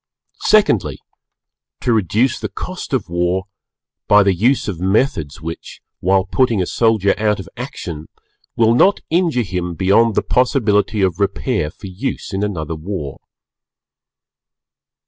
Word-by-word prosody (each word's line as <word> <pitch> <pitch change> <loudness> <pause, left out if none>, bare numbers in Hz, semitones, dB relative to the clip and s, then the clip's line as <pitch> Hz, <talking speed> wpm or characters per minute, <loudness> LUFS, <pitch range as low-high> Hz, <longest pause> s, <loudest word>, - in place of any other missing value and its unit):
Secondly, 105 - +3 0.8
to 120 - +1
reduce 110 +5 +1
the - - -4
cost 185 0 -7
of 130 -7 -1
war 90 +2 0 0.6
by 105 0 +6
the 100 -1 +3
use 120 +9 +1
of 95 -6 -4
methods 95 - 0
which, 80 +1 -7 0.2
while 95 +1 +2
putting 115 +1 +1
a 90 - +1
soldier 110 -1 +2
out 105 -1 +1
of 95 - -8
action, 80 -2 -7 0.5
will 115 0 +4
not 195 +11 +4
injure 165 -7 +2
him 90 -3 -4
beyond 105 +5 +3
the - - +1
possibility 110 -5 +1
of 95 -1 0
repair 95 -6 -1
for 80 - -13
use 95 +3 -5
in 95 - -1
another 85 -7 -3
War. 80 -3 -6
100 Hz, 135 wpm, -18 LUFS, 90-115 Hz, 0.8 s, by